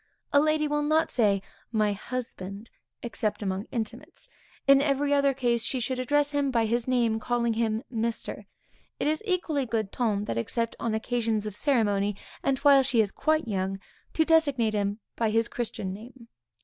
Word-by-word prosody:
A 285 - +7
lady 310 0 +2
will 295 0 0
not 310 +2 +2
say, 200 -5 +2 0.3
my 215 -2 +2
husband, 205 -2 -6 0.3
except 220 -3 -2
among 190 +1 -2
intimates; 235 - -6 0.4
in 275 0 +6
every 285 0 +1
other 280 -1 +4
case, 240 -3 0
she 260 - -1
should 255 +1 -2
address 290 +3 +2
him 285 -1 +1
by 230 -3 +2
his 235 +2 0
name, 235 -3 +2
calling 235 0 0
him 220 0 0
Mr. 230 0 -3 0.5
It - - -1
is 310 +1 +1
equally 320 -8 0
good 220 -3 -1
ton 210 -4 0
that 115 - -2
except 230 - -2
on 225 -2 -1
occasions 220 -2 -1
of 210 -2 -5
ceremony, 205 -7 +2 0.3
and 275 -1 +1
while 280 -1 +8
she 260 -3 +1
is 210 -3 +3
quite 310 -3 0
young, 195 -2 -2 0.3
to 320 - +2
designate 285 -9 +3
him 205 0 0 0.2
by 225 -2 +1
his 225 +2 +2
christian 210 -5 -3
name. 235 +4 -12
235 Hz, 175 wpm, -27 LUFS, 215-275 Hz, 0.5 s, while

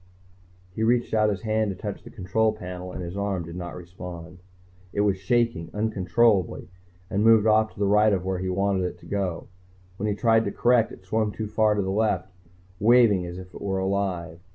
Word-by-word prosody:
He 110 - -5
reached 120 +1 +1
out 110 -1 +3
his 100 0 -3
hand 110 -1 +1
to 95 - -4
touch 105 +2 -6
the - - -11
control 110 +2 0
panel, 90 -3 -7
and 90 - -6
his 85 +2 -6
arm 100 -3 -2
did 85 +1 -9
not 90 -1 -6
respond. 90 0 -9 0.5
It 100 - 0
was 100 -2 +2
shaking, 115 -5 0
uncontrollably, 105 -3 +1 0.4
and 100 +2 0
moved 110 -1 +6
off 110 0 +3
to - - -15
the 100 - +2
right 105 +2 +4
of 95 -2 -1
where 95 -1 -1
he 95 0 -2
wanted 95 0 0
it 90 -1 -3
to - - -15
go. 95 -4 -3 0.5
When 105 +2 -1
he 105 - 0
tried 115 0 +3
to - - -2
correct, 120 -2 +3
it - - -12
swung 110 +2 0
too 110 - -5
far 110 0 +2
to 100 - 0
the 95 - -2
left, 95 -3 0 0.5
waving 110 -5 +4
as 85 +1 -7
if 90 0 -10
it - - -10
were 95 -1 -1
alive. 95 -3 -2
100 Hz, 210 wpm, -25 LUFS, 90-110 Hz, 0.5 s, moved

